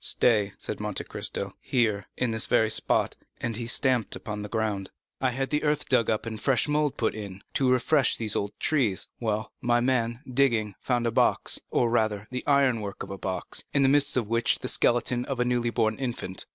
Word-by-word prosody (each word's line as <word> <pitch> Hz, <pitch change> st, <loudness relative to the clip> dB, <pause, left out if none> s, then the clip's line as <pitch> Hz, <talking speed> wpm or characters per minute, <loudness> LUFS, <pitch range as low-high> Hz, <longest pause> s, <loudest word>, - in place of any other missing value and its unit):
"Stay," 105 Hz, -4 st, +3 dB
said -, -, -4 dB
Monte -, -, -3 dB
Cristo, 100 Hz, -1 st, -3 dB
"here, 110 Hz, -6 st, 0 dB
in 125 Hz, -2 st, 0 dB
this 110 Hz, -1 st, +1 dB
very 110 Hz, -3 st, +3 dB
spot" 110 Hz, -, +1 dB, 0.2 s
(and 115 Hz, -2 st, -3 dB
he 115 Hz, +1 st, -4 dB
stamped 125 Hz, -3 st, +2 dB
upon 105 Hz, +3 st, -6 dB
the 105 Hz, -, -6 dB
ground), 105 Hz, -4 st, -2 dB, 0.3 s
"I 130 Hz, -, +2 dB
had 135 Hz, +3 st, -3 dB
the 150 Hz, -, +1 dB
earth 150 Hz, -1 st, 0 dB
dug 120 Hz, -4 st, +3 dB
up 110 Hz, 0 st, 0 dB
and 110 Hz, -2 st, -5 dB
fresh 135 Hz, 0 st, +2 dB
mould 150 Hz, -1 st, 0 dB
put 110 Hz, -, 0 dB
in, 100 Hz, -3 st, -8 dB
to 130 Hz, -2 st, +2 dB
refresh 130 Hz, +3 st, +3 dB
these 110 Hz, -2 st, -1 dB
old 100 Hz, 0 st, -3 dB
trees; 125 Hz, -11 st, +1 dB
well, 110 Hz, -2 st, -2 dB
my 120 Hz, 0 st, +2 dB
man, 120 Hz, -1 st, 0 dB
digging, 120 Hz, -5 st, +1 dB
found 120 Hz, -2 st, 0 dB
a 115 Hz, -, +1 dB
box, -, -, +2 dB
or 120 Hz, -2 st, +1 dB
rather, 110 Hz, -3 st, 0 dB
the 125 Hz, -, -3 dB
iron 135 Hz, -5 st, +3 dB
work 100 Hz, -2 st, -5 dB
of 95 Hz, -, -9 dB
a 100 Hz, -, -5 dB
box, 95 Hz, -3 st, -3 dB
in 140 Hz, -, +4 dB
the 135 Hz, -, +5 dB
midst 145 Hz, -1 st, +4 dB
of 120 Hz, -4 st, 0 dB
which 115 Hz, +1 st, +2 dB
was -, -, -5 dB
the -, -, -1 dB
skeleton 120 Hz, 0 st, +2 dB
of 135 Hz, -3 st, -4 dB
a 125 Hz, -, +2 dB
newly 120 Hz, -1 st, +1 dB
born 110 Hz, -2 st, 0 dB
infant." 120 Hz, -8 st, -3 dB
120 Hz, 215 wpm, -27 LUFS, 110-130 Hz, 0.3 s, the